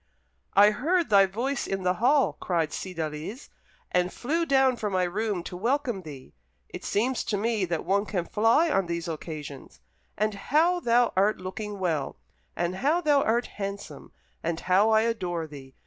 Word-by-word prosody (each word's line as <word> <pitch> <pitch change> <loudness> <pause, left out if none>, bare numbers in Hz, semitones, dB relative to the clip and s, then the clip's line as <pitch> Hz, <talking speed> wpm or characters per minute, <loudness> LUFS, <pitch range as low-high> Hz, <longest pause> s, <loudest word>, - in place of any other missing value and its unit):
"I 205 +1 +7
heard 320 - 0
thy 195 -1 +6
voice 245 +8 -2
in 195 -1 -3
the 180 0 +2
hall," 275 +3 +4
cried 165 -4 -1
Cydalise, 165 - -5 0.4
"and 180 0 +1
flew 330 +6 -1
down 265 -2 +4
from 210 -3 -3
my 185 -1 +2
room 195 0 -2
to 180 - -7
welcome 240 +1 -1
thee. 145 -6 -11 0.4
It - - -8
seems 245 +5 0
to 205 - -1
me 215 -1 0
that 170 -2 -3
one 200 +2 +1
can 180 -4 -2
fly 230 - +3
on 195 -10 +1
these 170 0 -3
occasions. 155 -4 -7 0.4
And 215 +1 0
how 315 - +2
thou 240 -4 +2
art 200 +3 +3
looking 205 +3 -6
well, 165 -7 -2 0.4
and 175 +2 -2
how 300 - +2
thou 295 -4 +3
art 235 +1 +1
handsome, 200 -7 -7 0.3
and 165 0 -2
how 190 +4 +3
I 220 0 +5
adore 180 -8 -2
thee!" 135 -3 -12
200 Hz, 170 wpm, -27 LUFS, 175-240 Hz, 0.4 s, I